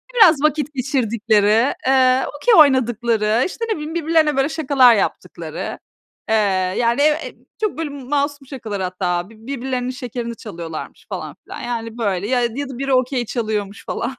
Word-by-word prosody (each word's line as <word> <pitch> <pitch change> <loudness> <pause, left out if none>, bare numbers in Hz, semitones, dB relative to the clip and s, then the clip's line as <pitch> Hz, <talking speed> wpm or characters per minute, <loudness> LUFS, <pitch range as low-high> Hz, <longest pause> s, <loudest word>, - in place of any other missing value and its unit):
biraz 335 - +6
vakit 300 -1 +1
geçirdikleri, 230 -3 +2
eee, 260 -1 +4
Okey 475 +10 +3
oynadıkları, 235 -5 +3
işte, 460 +5 -4
ne 440 - 0
bileyim, 305 +2 -6
birbirlerine 320 -2 +2
böyle, 270 +3 +2
şakalar 265 -6 +4
yaptıkları, 200 - -4 0.5
eee, 220 - +3 0.4
yani, 235 +3 +2
ev 305 +1 +5
Eee, 310 - -6 0.3
çok 420 -7 -1 0.3
masum 285 -1 -1
şakalar 225 -7 -5
hatta, 180 -1 -2
birbirlerinin 250 +2 -4
şekerini 245 -2 -5
çalıyorlarmış 170 -7 -8
falan - - -6
filan. - - -9
Yani 230 -1 -4
böyle 200 -4 -1
ya 250 +1 +1
ya 250 +4 -2
da 260 - -7
biri 275 +1 -1
okey 255 -1 +1
çalıyormuş 210 -4 -3
falan. 250 +3 -3
250 Hz, 150 wpm, -20 LUFS, 220-280 Hz, 0.5 s, biraz